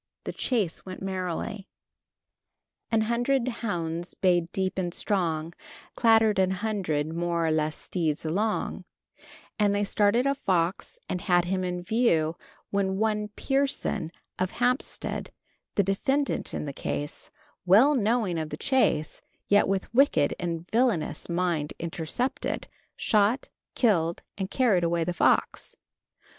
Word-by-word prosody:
The - - -5
chase 210 -10 -1
went 185 0 -8
merrily 190 +2 -3 1.2
An 225 -1 +3
hundred 240 +3 +1
hounds 175 -8 -3
bayed 175 -3 +2
deep 190 0 -1
and 175 -2 -1
strong, 170 -5 -1 0.4
Clattered 225 -3 +4
an 190 -1 +3
hundred 185 -7 -1
[more 170 0 0
or 160 - +2
less] 155 0 0
steeds 160 -4 -1
along, 205 +7 -1 0.8
and 205 -1 +3
they 205 - +1
started 205 +4 +2
a 275 - +3
fox 185 - -1
and 180 - -3
had 175 -1 +3
him 185 +1 -1
in 180 -1 -3
view, 175 -7 +2 0.4
when 190 -1 0
one 210 0 0
Pierson, 270 - 0 0.3
of 185 0 +1
Hempstead, 250 +5 -1 0.4
the 200 - +4
defendant 270 +9 0
in - - -3
the 140 - -5
case, 145 +2 -4 0.4
well 225 +11 +7
knowing 220 - +1
of 155 -1 -3
the - - -5
chase, 255 - +1 0.3
yet 205 0 +5
with 195 +2 -2
wicked 230 - +4
and 170 -1 -3
felonious 230 -10 +1
mind 170 -4 -1
intercepted, 170 +10 -2 0.3
shot, 215 +3 +2 0.3
killed 170 -8 +2
and 190 -1 -3
carried 215 -9 +2
away 170 0 +1
the 175 +2 -2
fox. - - +1
190 Hz, 130 wpm, -27 LUFS, 170-220 Hz, 1.2 s, well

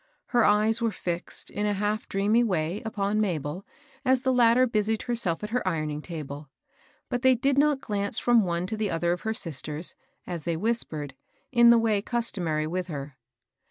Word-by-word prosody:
Her 240 -2 +3
eyes 215 +3 +4
were 230 - +2
fixed, 175 -3 -4
in 210 +1 -1
a 205 - 0
half 210 +3 -2
4reamy 210 +4 +2
way, 180 -3 -1
upon 215 -1 -1
Mabel, 175 -2 -3 0.4
as 260 -1 +2
the 260 -1 +2
latter 245 +1 +5
busied 220 -2 0
herself 230 -8 -1
at 210 - -5
her 245 -5 -1
ironing 155 -4 -2
table; 150 -3 -7 0.6
but 245 -2 -2
they 260 -1 +5
did 270 +3 +1
not 290 -2 +3
glance 205 +1 -1
&om 240 -2 +6
one 175 -1 -1
to 220 - -3
the 215 -2 -1
other 170 0 0
of 175 - -5
her 220 - -2
sisters, 155 - -2 0.3
as 175 -2 -5
they 170 -2 -1
whispered, 160 -9 -1 0.4
in 240 -2 +6
the 235 - +7
way 220 -3 +2
customary 185 -10 -1
with 180 +3 -3
her. 140 -4 -6
205 Hz, 185 wpm, -26 LUFS, 170-230 Hz, 0.6 s, the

